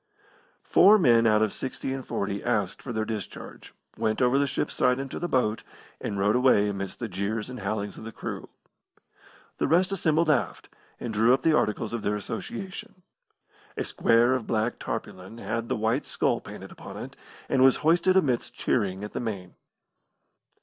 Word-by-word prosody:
Four 210 +3 +6
men 120 - +5
out 110 0 +4
of 110 - 0
six 130 - -6
and 135 0 -2
forty 100 -3 -3
asked - - -1
for - - -6
their 110 -1 -1
discharge, 110 -4 -7 0.2
went 110 0 -1
over 125 +2 +3
the 140 - +2
ship's - - -2
side 125 0 +2
into 135 0 -5
the 175 - -2
boat, 115 -7 +1 0.4
and 100 - -4
rowed 100 +3 +2
away 125 -5 +4
amidst 100 -1 -5
the 120 - -3
jeers 105 +4 -3
and 125 - -7
howlings 100 0 -3
of - - -10
the 115 - -7
crew. - - -6 1.1
The - - +1
rest 180 +4 +3
assembled 165 -4 +2
aft, 125 - 0 0.3
and 120 -2 -4
drew 115 +4 +5
up - - -8
the 160 -1 +4
articles 105 -3 0
of 115 - -2
their 105 0 0
association. 180 - -6 0.7
A - - 0
square 120 +2 +3
of 130 -4 -2
black 110 +1 0
tarpaulin 95 +5 -6
had 115 +2 -3
the - - +1
white 110 +6 0
skull - - 0
painted - - -10
upon - - -10
it, - - -8 0.3
and 130 -1 +3
was 135 -1 +6
hoisted 175 +3 +4
amidst 130 -10 0
cheering 100 -4 0
at 105 - -7
the - - -2
main. 100 -6 -5
115 Hz, 180 wpm, -27 LUFS, 105-135 Hz, 1.1 s, Four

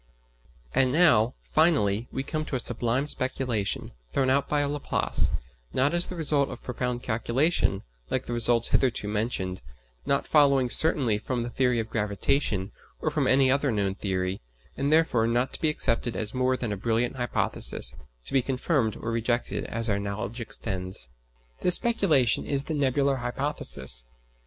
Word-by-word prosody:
And 130 -1 +3
now, 125 -7 +4
finally, 120 -9 +2
we 135 - -3
come 155 +2 -3
to 140 - -4
a - - 0
sublime 120 +3 0
speculation, 130 -7 -2 0.2
thrown 130 -1 +1
out 140 +1 +1
by 145 -1 +1
Laplace, 145 0 0 0.4
not 140 +4 +2
as 175 0 +5
the 185 - -6
result 145 -4 +1
of - - -9
profound 125 0 -3
calculation, 120 - 0 0.3
like 130 - -1
the 120 - -4
results 120 0 +3
hitherto 120 -5 +1
mentioned, 105 - -2 0.5
not 140 - +1
following 140 -4 +4
certainly 130 -9 +3
from 120 +2 -3
the 120 - -5
theory 125 -2 +1
of 110 0 -4
gravitation, 105 -1 0 0.3
or - - -1
from - - 0
any 130 0 +4
other 140 0 +2
known 100 -3 0
theory, 95 -1 -3 0.3
and 140 +2 -1
therefore 155 -8 +3
not 120 +3 0
to - - -6
be 155 - +3
accepted 120 -5 0
as 110 -1 0
more 130 0 +1
than 120 -4 -3
a 105 - -2
brilliant 115 +5 -1
hypothesis, 120 -2 0 0.3
to - - -6
be 135 - +4
confirmed 130 -2 0
or 115 - -5
rejected 115 +1 -1
as 115 0 -1
our 100 -2 +1
knowledge 100 +3 -4
extends. 95 - -4 0.5
This 180 - +5
speculation 190 - +2
is 140 -1 -1
the 160 - -4
"Nebular 140 -1 +1
hypothesis." 120 - -1
125 Hz, 160 wpm, -26 LUFS, 110-140 Hz, 0.5 s, as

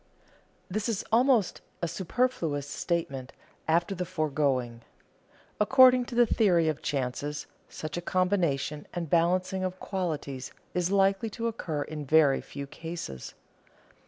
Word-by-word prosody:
_ - - -35 0.6
This 210 +4 -2
is 215 -4 -2
almost 240 -3 +3 0.2
a - - +2
superfluous 170 - -1
statement 140 -4 -3 0.3
after 170 +4 +2
the 180 -1 -3
foregoing. 140 -8 -1 0.8
According 255 +3 +6
to 240 - -7
the 240 0 +6
theory 180 -8 +3
of 155 -2 -1
chances, 140 +2 -2 0.2
such 155 +1 -6
a - - -2
combination 175 -6 0
and 170 -4 -4
balancing 185 +3 +2
of 185 0 -3
qualities 150 -9 -4 0.2
is 180 0 0
likely 195 +2 +2
to 230 +2 -5
occur 165 -10 -2
in 155 -1 -6
very 145 -1 +4
few 140 0 -7
cases. 145 - -7
170 Hz, 130 wpm, -28 LUFS, 145-195 Hz, 0.8 s, According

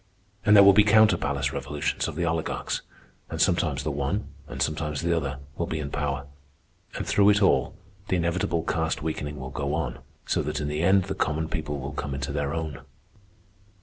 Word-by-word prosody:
And 105 - +6
there 100 - +9
will 100 0 +8
be 105 - +7
counter 110 -2 +6
palace 70 -2 -1
revolutions 75 +1 -2
of - - -5
the 85 +1 -1
oligarchs, 80 -1 -2 0.5
and - - -5
sometimes - - +2
the 75 - -1
one, 70 +9 -2 0.2
and - - -7
sometimes 75 -1 -1
the 85 0 +2
other, 70 -4 -2 0.2
will - - 0
be 80 - -3
in 70 -2 -4
power. 70 -2 -2 0.7
And - - -3
through 100 0 +4
it 105 0 +4
all 70 -8 +3 0.3
the - - +1
inevitable 85 -1 0
caste 80 -2 -1
weakening 75 -2 -3
will 65 0 -6
go 70 +1 -2
on, 80 - -3 0.3
so - - +1
that - - -3
in 75 -1 -2
the 75 +1 -2
end 95 +2 +4
the 95 - -4
common 80 +1 -1
people 75 -4 -3
will 70 +2 -5
come 70 -1 -4
into 70 0 -3
their 70 -1 -1
own." 80 -4 -4
75 Hz, 200 wpm, -26 LUFS, 70-85 Hz, 0.7 s, there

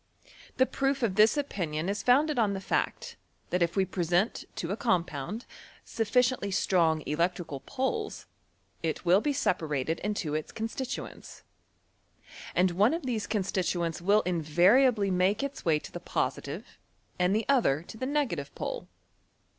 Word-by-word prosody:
The 260 - +5
proof 270 0 -1
of 215 -5 +2
this 215 +7 +5
opinion 175 - -2
is 200 +2 -1
founded 285 +3 +3
oa 220 -3 +3
the 195 -1 -2
fact, - - -2 0.3
that 180 - +1
if 170 0 +1
we 195 -1 +3
present 180 +3 0
to 165 - -3
a - - 0
compound, 185 - -1 0.4
suffici 250 +3 +2
ently 200 -4 -5
strong 165 -5 +2
electrical 165 -2 -1
poles, 275 - -3 0.6
it 165 +2 -3
will 180 +4 +5
be 295 - 0
separated 160 - -1
into 205 -7 -2
its 155 0 -3
constituents, 230 +3 -6 1.1
and 180 0 +3
one 205 - +3
of 335 - -5
these 230 -4 -2
constituents 180 -5 -1
will 205 +4 +4
invariably 190 - +3
make 185 +6 +2
its 280 0 -5
way 160 -3 +4
to - - -9
the - - -6
positive - - -3 0.4
and 180 +2 +3
the 220 - 0
other 220 - +3
to 180 - -11
the 255 +4 -3
negative 235 - -1
pole. - - -4
195 Hz, 150 wpm, -29 LUFS, 170-245 Hz, 1.1 s, The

